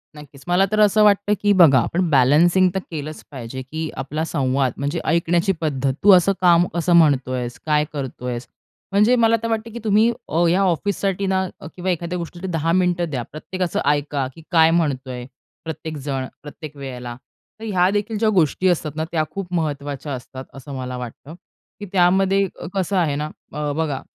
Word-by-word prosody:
नक्कीच. 145 -2 -13
मला 180 +2 +3
तर 215 - +1
असं 210 0 +5
वाटतं 205 0 +3
की 205 - +3
बघा 140 -6 +7
आपण 170 +8 0
बॅलन्सिंग 160 +7 +4
तर - - +1
केलंच 155 -1 -6
पाहिजे 130 0 -7
की 155 +4 -5
आपला 145 +4 -3
संवाद 135 -4 0
म्हणजे 145 +4 -2
ऐकण्याची 170 +3 +2
पद्धत 135 -3 0
"तू 205 - +8
असं 195 +3 +2
काम 175 -1 +5
कसं 170 +1 +1
म्हणतोयस? 130 -6 +2
काय 150 -1 +2
करतोयस?" 125 -3 -5 0.4
म्हणजे 210 +5 +4
मला 230 -1 +4
तर - - 0
वाटतं 225 0 -2
की 235 - -6
तुम्ही 215 +2 +3 0.2
अ, 170 +3 +2
या 185 +3 +2
ऑफिससाठी 195 +2 0
ना 190 0 +1 0.3
किंवा 185 +1 -3
एखाद्या 175 +1 -3
गोष्टीसाठी 175 +2 -6
10 165 0 0
मिनिटं 175 -2 +1
द्या. 130 -4 -3
प्रत्येकाच 180 +3 -4
ऐका 145 -2 0
की 165 - -12
काय 160 -2 +5
म्हणतोय? 130 -6 -1 0.4
प्रत्येक 160 0 -6
जण, 135 -2 -3 0.2
प्रत्येक 150 0 -9
वेळेला. 125 -3 -7 0.4
तर - - -10
ह्या 185 -3 +2
देखील 210 +1 -1
ज्या 220 0 +2
गोष्टी 185 -1 +2
असतात 160 -3 0
ना 160 - -2
त्या 160 -2 +1
खूप 190 -2 -6
महत्वाच्या 145 -3 -3
असतात, 130 +1 -8
असं 135 +1 -10
मला 125 0 -5
वाटतं. 125 +5 -9 0.5
की 205 - -6
त्यामध्ये 190 +2 +3 0.3
कसं 195 0 -1
आहे 155 -6 +1
ना 150 +1 -3 0.2
अ, 150 -1 -2
बघा 150 -4 -2
160 Hz, 175 wpm, -21 LUFS, 140-185 Hz, 0.5 s, तू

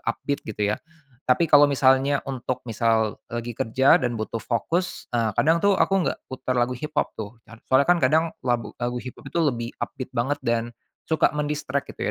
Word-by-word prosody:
upbeat 140 +5 -2
gitu 105 -1 0
ya. - - -2 0.5
Tapi 130 +7 +4
kalau 145 -2 +6
misalnya 135 0 +3
untuk 130 -2 -4
misal 115 -2 0
lagi 120 0 -4
kerja 125 +4 +3
dan 120 -2 -1
butuh 110 +1 -4
fokus, 165 - -2
eee, 115 -2 +1
kadang 165 +2 +3
tuh 200 -1 +3
aku - - +2 0.2
nggak - - -5
putar 130 -1 -4
lagu 120 +1 +1
hiphop 150 +5 -2
tuh. 110 +2 -7
Car 115 0 -15
soalnya 130 +2 +5
kan 175 +1 +3
kadang 155 +5 +4 0.2
lag 120 -2 0 0.2
lagu 120 0 -2
hiphop 125 +3 -8
tu 165 +4 0
lebih 120 -4 -2
upbeat 130 - -5
banget 140 +5 0
dan 120 0 -1 0.3
suka 160 - +3
men-distract 150 -2 -2
gitu - - -2
130 Hz, 185 wpm, -24 LUFS, 115-145 Hz, 0.5 s, kalau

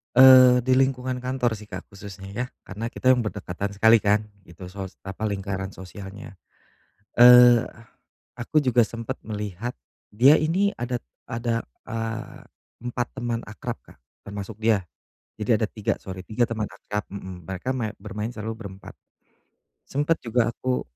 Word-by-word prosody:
Eee, 130 -1 +9
di 130 - 0
lingkungan 130 -1 +1
kantor 125 -1 -1
sih 105 0 -12
Kak 95 -3 -7
khususnya 100 -1 -10
ya, 125 +5 -2 0.2
karena 105 +5 -5
kita 130 +2 +2
berdekatan 100 -3 -4
sekali 110 +2 +6
kan 105 +1 +2 0.2
itu 85 +2 -13
sos 95 -1 -7
apa 95 +3 -4
lingkaran 95 -1 -4
sosialnya. 95 +3 -10 0.8
Eee, 120 -1 +9 0.8
aku 145 +5 +1
juga 125 -2 +4
sempet 115 0 -6
melihat 105 +2 -5 0.3
dia 130 +8 +5
ini 185 +6 +1
ada 120 +1 -1 0.3
ada, 115 0 -1 0.2
eee, 115 0 -5 0.4
4 120 0 -2
teman 120 -2 -2
akrab 115 +2 -6
Kak - - -18 0.3
termasuk 100 +1 -7
dia, 110 -1 +2 0.6
jadi 110 0 +1
ada 110 - +1
3 105 -1 -2
sorry, 95 -1 -8
3 115 +3 0
teman 110 -2 -2
akrab 105 0 -5
mhm, 95 -3 -8
mereka 95 +10 -3
ma 110 -4 -2
bermain 105 +2 -5
selalu 110 0 -5
berempat, 100 -3 -10 0.9
sempet 145 +4 0
juga 115 0 +2
aku 125 +1 -2
115 Hz, 145 wpm, -25 LUFS, 100-125 Hz, 0.9 s, Eee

